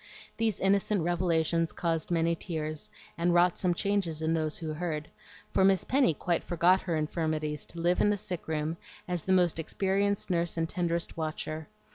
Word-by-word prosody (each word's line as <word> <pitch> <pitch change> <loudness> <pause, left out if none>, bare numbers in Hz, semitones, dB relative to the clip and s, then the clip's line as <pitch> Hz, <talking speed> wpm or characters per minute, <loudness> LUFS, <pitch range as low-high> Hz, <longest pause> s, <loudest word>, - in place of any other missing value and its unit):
These 225 -3 0
innocent 200 -1 +2
revelations 165 -1 +1
caused 165 -2 -1
many 170 -1 +2
tears, 155 -2 -4 0.3
and 175 +1 +2
wrought 175 +1 +4
some 180 -2 +1
changes 195 -5 0
in 160 0 0
those 155 -2 -1
who 160 -2 -4
heard; 155 -2 -4 0.4
for 190 - +3
Miss 190 -1 +4
Penny 260 - +3
quite 170 +2 0
forgot 175 +2 +3
her 170 -3 -2
infirmities 155 -1 -2
to 170 - -7
live 175 +2 +2
in - - +4
the 210 - +2
sick 180 -3 -4
room 160 +1 -2 0.3
as 175 -3 -2
the 190 - 0
most 175 -3 +3
experienced 195 +4 0
nurse 170 -1 0
and 165 0 +1
tenderest 170 -1 -2
watcher. 155 0 -4
170 Hz, 175 wpm, -29 LUFS, 160-185 Hz, 0.4 s, wrought